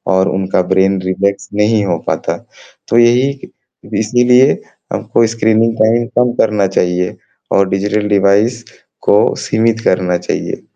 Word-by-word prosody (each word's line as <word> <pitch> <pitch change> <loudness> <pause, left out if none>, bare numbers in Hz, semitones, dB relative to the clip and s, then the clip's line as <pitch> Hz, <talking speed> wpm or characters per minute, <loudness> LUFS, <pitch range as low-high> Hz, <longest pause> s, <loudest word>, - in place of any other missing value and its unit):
और 95 +1 +2
उनका 95 0 0
brain 95 0 +2
reflex 100 +2 -2
नहीं 105 +1 +1
हो 90 -3 -1
पाता। - - -2 0.5
तो 115 - +2
ये 125 +4 +3
क - - -19 0.4
इसीलिए 125 +4 +3 0.5
हमको 115 - +1
स्क्रीनिंग 115 0 +1
टाइम 115 +2 +2
कम 125 0 +3
करना 105 -2 +1
चाहिए, 90 -1 -1 0.4
और 100 -1 +3
डिजिटल 105 +2 -1
डिवाइस 105 +4 +2 0.4
को 105 +1 +2
सीमित 115 +1 0
करना 90 -1 +1
चाहिए। - - -4
105 Hz, 135 wpm, -14 LUFS, 95-115 Hz, 0.5 s, ये